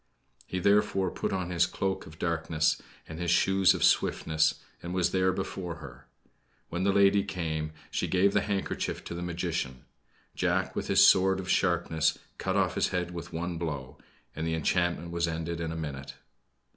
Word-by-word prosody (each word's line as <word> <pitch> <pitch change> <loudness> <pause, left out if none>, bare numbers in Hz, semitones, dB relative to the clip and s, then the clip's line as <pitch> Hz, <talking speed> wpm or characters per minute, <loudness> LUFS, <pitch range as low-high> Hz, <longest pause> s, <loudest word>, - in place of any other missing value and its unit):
He, 95 - -3
therefore, 100 -1 +2
put - - -3
on 90 -2 -2
his 85 0 +3
coat 95 0 -2
of 80 0 -13
darkness, 80 -2 0 0.3
and 80 +1 -8
his 90 -1 -1
shoes 95 +2 +4
of - - -2
swiftness, 80 -1 +3 0.3
and 85 +1 -5
was 90 -2 +2
there 95 0 +2
before 95 -2 -4
her. 70 -7 -12 0.6
When 85 +2 -2
the 100 - +3
lady 100 0 +4
came, 80 -6 -3 0.2
she - - -1
gave 95 +2 +3
the 100 - +3
handkerchief 100 -2 -2
to - - -6
the 85 - -5
magician. 85 -6 -3 0.5
Jack - - 0
with - - -3
his - - +6
sword 95 0 +5
of 95 0 -3
sharpness 80 -3 +2 0.2
cut - - -1
off - - +2
his - - +1
head 90 -1 -2
with 85 -1 -7
one 85 0 -3
blow; 70 -4 -5 0.4
and 80 +2 -3
the 80 - 0
enchantment 85 +1 0
was 85 0 0
ended 85 +1 -3
in 80 -1 -2
a - - -4
minute. 70 -3 -6
85 Hz, 180 wpm, -29 LUFS, 80-95 Hz, 0.6 s, his